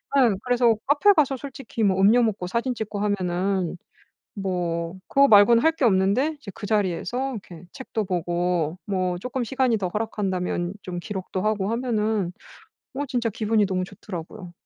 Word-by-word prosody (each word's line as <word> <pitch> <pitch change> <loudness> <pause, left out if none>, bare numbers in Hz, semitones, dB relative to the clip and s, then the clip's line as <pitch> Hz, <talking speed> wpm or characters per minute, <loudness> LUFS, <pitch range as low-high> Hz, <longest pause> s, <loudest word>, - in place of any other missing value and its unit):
네 250 -6 +5
그래서 245 -2 +3
카페 295 +9 +5
가서 285 -6 +2
솔직히 260 -4 -5
뭐 190 -2 +2
음료 220 +5 +5
먹고 210 -5 -1
사진 235 +6 -1
찍고 215 -2 -4
하면은 185 -2 -1 0.6
뭐 175 -3 -2
그거 280 0 +5
말고는 230 +1 +6
할 320 - +5
게 305 -5 0
없는데 210 +9 +2
이제 215 -8 -9
그 - - -7
자리에서 215 +6 -1
이렇게 180 -7 -9
책도 225 -5 -4
보고 175 -2 -1
뭐 185 -3 -1
쪼끔 250 +4 -3
시간이 255 -1 +1
더 195 -3 -2
허락한다면 190 -4 -2
좀 180 -1 -5
기록도 190 -1 -4
하고 210 -1 0
하면은 220 -6 0 0.6
어 285 +2 -2
진짜 245 -3 -1
기분이 215 0 +1
너무 185 -1 -1
좋더라고요. 180 -1 -9
205 Hz, 335 characters per minute, -24 LUFS, 185-240 Hz, 0.6 s, 말고는